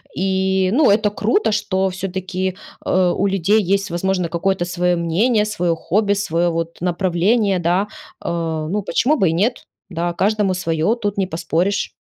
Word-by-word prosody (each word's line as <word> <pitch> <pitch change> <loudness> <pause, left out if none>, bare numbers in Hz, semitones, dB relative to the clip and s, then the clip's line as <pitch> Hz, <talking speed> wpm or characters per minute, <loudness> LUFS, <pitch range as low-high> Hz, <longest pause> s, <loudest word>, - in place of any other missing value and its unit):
И 190 0 +1
ну 295 +3 +4
это 210 0 +3
круто, 220 - +1
что 200 -3 0
всё-таки, 185 0 -3 0.3
э, 185 -1 +2
у 200 - +1
людей 195 +3 +2
есть 195 0 0
возможно 180 0 -1
какое-то 175 +2 0
свое 175 0 0
мнение, 210 +7 +1
свое 175 -5 -1
хобби, 200 +5 +1
свое, 175 -4 0
вот, 165 0 -4
направление, 185 +3 +1
да, 180 +4 +1 0.4
э. - - -3 0.4
Ну 210 +1 0
почему 285 +9 +1
бы 190 -9 +3
и 160 - 0
нет, 215 +9 -1 0.2
да, 175 -1 -2
каждому 200 0 +1
свое- 165 +4 0
тут 205 -1 -2
не 190 -2 0
поспоришь. 175 +3 -1
190 Hz, 160 wpm, -19 LUFS, 175-205 Hz, 0.4 s, ну